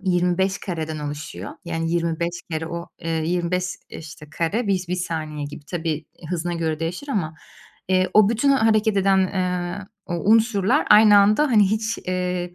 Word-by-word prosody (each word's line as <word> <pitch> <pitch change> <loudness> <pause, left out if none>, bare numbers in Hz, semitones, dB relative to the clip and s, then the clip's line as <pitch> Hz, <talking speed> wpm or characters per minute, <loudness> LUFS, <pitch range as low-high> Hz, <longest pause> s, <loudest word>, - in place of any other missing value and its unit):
25 185 +1 +1
kareden 160 -4 -4
oluşuyor. 150 +1 -6
Yani, 165 -1 -2
25 170 0 -1
kere 160 0 -3
o 170 +1 -6
eee, 165 -1 -5 0.2
25, 180 +1 0 0.2
işte, 150 -1 -10
kare 185 +9 -1
bis 185 -3 0
bir 180 - -1
saniye 155 -4 -4
gibi. 145 +1 -10
Tabii, 165 0 -3
eee, 155 +1 -7
hızına 175 0 -2
göre 160 -2 -2
değişir 175 - -4
ama, 165 - -2 0.5
eee, 185 0 +2
o 215 -1 +6
bütün 235 +5 +2
hareket 220 -5 +3
eden, 195 0 +3
eee, 180 0 -2 0.2
o 175 - -3 0.2
unsurlar 225 +3 +3
aynı 210 -1 +8
anda 210 +8 +4
hani 210 -6 +4
hiç, 220 +1 -1
eee, 180 -1 -2
180 Hz, 165 wpm, -22 LUFS, 165-200 Hz, 0.5 s, aynı